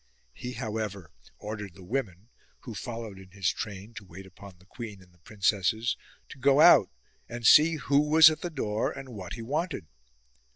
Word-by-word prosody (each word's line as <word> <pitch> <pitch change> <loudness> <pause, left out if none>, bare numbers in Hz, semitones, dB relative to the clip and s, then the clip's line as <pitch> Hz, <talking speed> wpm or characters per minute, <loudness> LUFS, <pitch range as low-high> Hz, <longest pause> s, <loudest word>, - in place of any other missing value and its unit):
He 125 - -7
however 110 - -5 0.3
ordered 105 -4 -7
the 95 - -13
women 105 -2 -4 0.3
(who 120 - -8
followed 115 -3 -7
in 95 -1 -14
his 95 -1 -1
train 100 +1 -7
to 110 - -9
wait 95 +1 -12
upon 95 0 -14
the 90 - -23
queen 105 0 -9
and 90 -1 -20
the 85 - -27
princesses) 105 +4 0 0.3
to - - -12
go 135 +2 +4
out 155 - +7 0.4
and 120 -1 -6
see 160 +6 +7
who 140 -1 +1
was 155 +1 +7
at 155 - -6
the 175 - -3
door 110 -9 -2
and 135 -1 -9
what 100 -7 -8
he 115 - -7
wanted. 150 - -3
110 Hz, 180 wpm, -28 LUFS, 95-130 Hz, 0.4 s, out